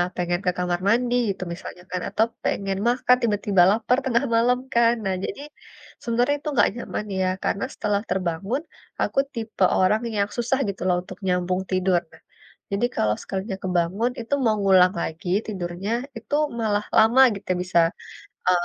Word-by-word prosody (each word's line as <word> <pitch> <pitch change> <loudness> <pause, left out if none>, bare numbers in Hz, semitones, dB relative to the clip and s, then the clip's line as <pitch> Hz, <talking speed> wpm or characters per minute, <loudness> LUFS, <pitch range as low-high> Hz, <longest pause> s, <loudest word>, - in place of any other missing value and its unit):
pengen 175 0 -1
ke 180 - +3
kamar 180 -1 -1
mandi 240 +3 +2
gitu 190 -1 -3
misalnya 180 0 -9
kan, 180 -1 -2
atau 220 - +2 0.2
pengen 195 -1 -1
makan, 250 +1 +4
tiba-tiba 205 -3 +2
lapar 235 +3 +1
tengah 240 +1 +2
malam 245 +2 +3
kan. 235 0 +4
Nah 190 -1 0
jadi, 280 - -5 0.6
sebenarnya 245 +4 +1
itu 300 - -4
enggak - - +4
nyaman 235 -3 -5
ya, 185 - +2 0.2
karena 200 - 0
setelah 205 -1 -1
terbangun, 190 - -1 0.4
aku - - +1
tipe 225 -5 -3 0.2
orang 210 +4 +3
yang 200 0 +1
susah 245 +3 0
gitu 195 - -6
loh 180 - +3
untuk - - -10
nyambung 180 +1 0
tidur. 185 -1 +2
Nah, - - -18 0.5
jadi 200 +5 +1
kalau 105 0 +1
sekalinya 190 0 -4
kebangun 185 +6 0
itu 230 - -5
mau 215 -1 +3
ngulang 185 -1 +5
lagi 165 +2 -5 0.2
tidurnya, 185 0 -4 0.3
itu 235 +6 -3 0.2
malah 210 -2 0
lama 230 +4 +6
gitu 190 - -5
bisa, 180 -1 +2 0.7
e 185 - +6
200 Hz, 165 wpm, -24 LUFS, 180-235 Hz, 0.7 s, lama